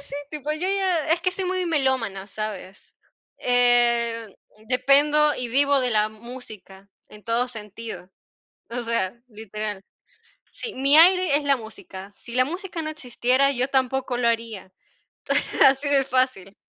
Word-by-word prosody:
sí, - - -7 0.2
tipo, 300 0 -4
yo 310 - -6
ya 375 -5 0
es 335 +2 +2
que 370 - +1
soy 380 0 -2
muy 370 0 -2
melómana, 260 - -1
¿sabes?, 205 -2 -7 0.4
eh, 240 -2 +2 0.4
dependo 290 +3 +3
y 250 -1 -4
vivo 280 +2 +4
de 250 - +1
la 215 -1 +2
música 215 -4 -12 0.2
en 210 0 -16
todo 235 +2 0
sentido, 220 -3 -8 0.6
o 240 +1 -4
sea, 230 -2 -2
literal. 215 -2 -6 0.7
Sí, 460 - -5
mi 275 +3 +4
aire 355 -2 +6
es 295 - -1
la 280 -1 +3
música. 210 -4 -10
Si 235 +4 -10
la 255 - +4
música 350 +2 -5
no 310 - -4
existiera, 260 -1 +1
yo 255 +1 0
tampoco 265 -1 -1
lo 240 - 0
haría, 225 -5 -3 0.9
así 270 +2 +2
de 275 -1 +3
fácil. 255 -7 -1
250 Hz, 145 wpm, -23 LUFS, 220-285 Hz, 0.9 s, aire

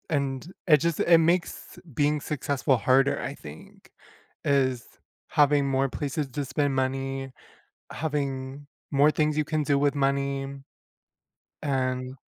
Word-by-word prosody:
And 140 +1 -2 0.2
it 155 -3 +7
just 165 +2 -1
it 170 -1 +6
makes 170 +2 -1
being 150 +3 +1
successful 140 -2 0
harder, 130 +5 +2
I 135 - -4
think, 75 - -13 0.5
is 130 -4 +1 0.4
having 145 -2 +3
more 135 0 +1
places 145 +1 -3
to 145 +3 -3
spend 140 +1 0
money, 135 0 -2 0.6
having 140 -2 -3 0.2
more 145 +1 +5
things 155 0 0
you 155 - +1
can 155 0 -1
do 140 -1 +2
with 145 0 +2
money, 140 0 -1 1.1
and 130 -2 -1
140 Hz, 125 wpm, -26 LUFS, 135-150 Hz, 1.1 s, it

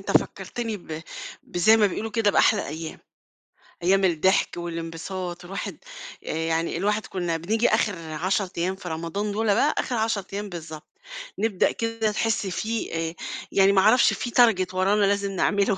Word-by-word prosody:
أنت - - -5
فكّرتني 230 -3 0
ب 160 -4 -8 0.4
بزي 195 +6 +4
ما 215 -2 +5
بيقولوا 220 +3 -3
كده 220 -1 +2
بأحلى 205 0 +3
أيام، 160 +2 -6 0.9
أيام 195 +2 +3
الضحك 180 +2 +2
والانبساط، 175 +1 -5
والواحد 195 +3 -5 0.5
آآ - - -3
يعني 165 +1 -1
الواحد 210 +3 0
كُنّا 175 -3 -2
بنيجي 220 +8 +1
آخر 205 - +2 0.2
10 185 +5 0
أيام 180 +3 0
في 190 -2 -8
رمضان 170 +6 -3
دُولّة 215 0 +1
بقى، 295 +9 +2
آخر 250 - -1
10 220 -3 0
أيام 205 +1 -4
بالضبط، 160 -3 -8 0.5
نبدأ 210 -3 +2
كده 230 -1 -1
تحس 220 -1 0
في 220 +4 -3
آآ 165 0 -2 0.4
يعني 195 0 +5
ما 195 -1 +4
أعرفش 220 +5 +5
في 245 - -3
Target 220 -7 +4
ورانا 200 +3 +3
لازم 200 0 +1
نعمله 200 +1 +1
195 Hz, 160 wpm, -25 LUFS, 175-215 Hz, 0.9 s, ما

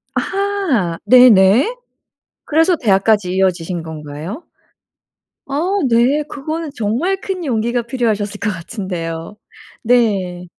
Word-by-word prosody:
아. 385 - -1
네네. 245 - +6 0.7
그래서 325 +4 +3
대학까지 205 - +1
이어지신 180 -2 -1
건가요? 160 - -7 1.0
아 280 +1 -2 0.3
네. 245 +6 +3
그거는 310 +2 -5
정말 250 - -1
큰 380 -3 -5
용기가 235 -3 -1
필요하셨을 220 -4 -2
것 220 - -1
같은데요. 170 -2 -5 0.5
네. 200 -7 +1
225 Hz, 220 characters per minute, -17 LUFS, 185-280 Hz, 1.0 s, 네네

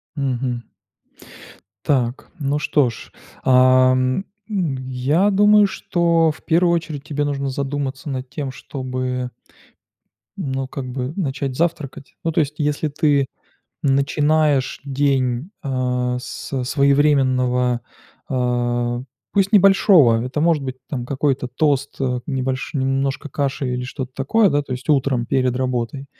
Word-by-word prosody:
Мгм. 125 -3 -2 1.2
Так, 125 -3 0
ну 145 +1 0
что 140 -3 +2
ж. 115 - -10 0.3
Ам, 130 +4 +4 0.2
м, 180 -9 -1
я 145 +10 +2
думаю, 210 +1 +5
что 170 -3 +1
в 150 - -13
1 170 +1 +3
очередь 155 -4 -4
тебе 145 -1 -2
нужно 140 -1 -2
задуматься 140 +1 -3
над 130 -1 -4
тем, 135 0 -4
чтобы 130 -1 -4 1.1
ну, 135 -1 -3
как 135 -1 -6
бы 130 +2 -4
начать 135 -6 -2
завтракать. 155 -5 -3
Ну 165 - 0
то, 165 - +2
есть, 150 0 -3
если 150 +1 0
ты 145 -2 +2 0.6
начинаешь 145 0 +2
день 135 +1 0
а 125 -2 -1
со 130 0 -5
своевременного, 130 -3 +2 0.5
a, 120 -1 0 0.3
пусть 195 +1 +2
небольшого, 190 - +6
это 130 +4 -3
может 160 -2 +2
быть 130 -1 -5
там 125 -4 -3
какой-то 135 -2 -1
тост, 140 +2 0
э, 125 -2 0
небольш 130 -2 -2
немножко 135 +2 -1
каши 135 -2 -2
или 125 - -3
что-то 130 0 -6
такое, 200 +10 +3
да, 145 0 +1
то 135 - -7
есть 125 0 -6
утром 135 -4 +2
перед 130 -1 +1
работой. 130 +1 -2
135 Hz, 130 wpm, -21 LUFS, 130-150 Hz, 1.2 s, небольшого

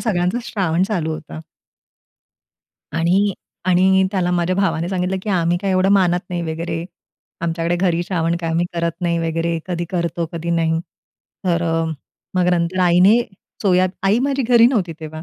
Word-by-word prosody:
सगळ्यांचा 185 0 0
श्रावण 180 -6 0
चालू 165 -6 -1
होता. 155 0 -8 1.6
आणि 190 +5 +2 0.3
आणि 190 +1 +4
त्याला 180 -2 0
माझ्या 180 +1 +1
भावाने 175 -4 0
सांगितलं, 185 0 -1
की 215 - -7
आम्ही 175 -1 +2
काय 195 +1 -2
एवढं 185 0 +2
मानत 180 -3 +3
नाही 175 -1 -2
वगैरे. 165 0 -4 0.6
आमच्याकडे 170 +1 -1
घरी 175 -1 +1
श्रावण 170 -2 -1
काय 165 - -2
आम्ही 170 +2 +1
करत 170 -1 -1
नाही 170 -1 0
वगैरे, 165 0 -1
कधी 175 -2 -2
करतो, 170 -1 -1
कधी 170 0 -4
नाही. 165 -1 +1 0.6
तर 175 -2 +1
अ, 165 -1 0 0.5
मग 180 -1 +2
नंतर 170 +1 0
आईने 180 +6 +5 0.4
सोया 185 -2 +4 0.2
आई 200 +4 +3
माझी 275 +1 0
घरी 235 -1 +5
नव्हती 200 -10 0
तेव्हा. 155 0 -7
175 Hz, 160 wpm, -20 LUFS, 165-190 Hz, 1.6 s, आईने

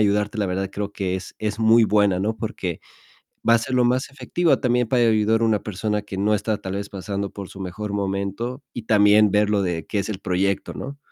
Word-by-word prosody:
ayudarte", 105 +1 +1
la 100 - +1
verdad 95 +1 -2
creo 105 0 -4
que 95 -2 -2
es 95 -1 -6
es 110 0 -3
muy 115 +1 +5
buena, 100 -3 +3
¿no? 110 +3 -1
Porque 90 -6 -4 0.7
va 115 - +7
a - - +5
ser 130 +3 -3
lo 125 - +4
más 125 +2 +1
efectiva, 150 +1 +1
también 125 -2 +2
para 120 -1 +3
ayudar 110 0 +3
a - - +4
una 110 -2 +2
persona 105 +1 -2
que 100 -1 -8
no 105 +2 +2
está, 105 +1 0
tal 95 -2 -6
vez, 100 0 -4
pasando 100 +1 -4
por 100 -1 -8
su 95 - -12
mejor 100 +3 -5
momento, 100 +6 -3
y 120 - -6
también 105 -1 +5
ver 105 0 +3
lo 100 -2 +2
de 85 -3 -2
qué 105 - -2
es 100 - -3
el 95 - -4
proyecto, 95 +1 -1
¿no? 140 +2 -7
105 Hz, 230 wpm, -23 LUFS, 100-110 Hz, 0.7 s, va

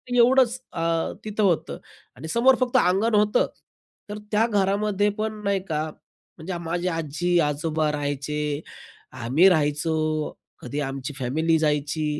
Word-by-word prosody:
एवढंच 250 0 +4
अ, 165 -1 -1
तिथं 215 0 -1
होतं 165 - +1 0.4
आणि 155 - -8
समोर 255 +3 +5
फक्त 255 0 +2
अंगण 215 +2 +2
होतं, 210 0 +3 0.6
तर 210 - -5
त्या 215 +2 +3
घरामध्ये 205 0 +1
पण 215 0 -3
नाही 200 -1 +1
का, 155 -1 0 0.6
म्हणजे 175 +3 -5
माझे 175 +2 -2
आजी, 165 +2 -1
आजोबा 155 0 0
राहायचे. 145 +1 -2 0.5
आम्ही 130 +8 +3
राहायचो, 150 -1 +1 0.7
कधी 140 +4 -5
आमची 135 +1 -5
फॅमिली 160 +6 +1
जायची, 150 0 0
165 Hz, 130 wpm, -24 LUFS, 150-210 Hz, 0.7 s, समोर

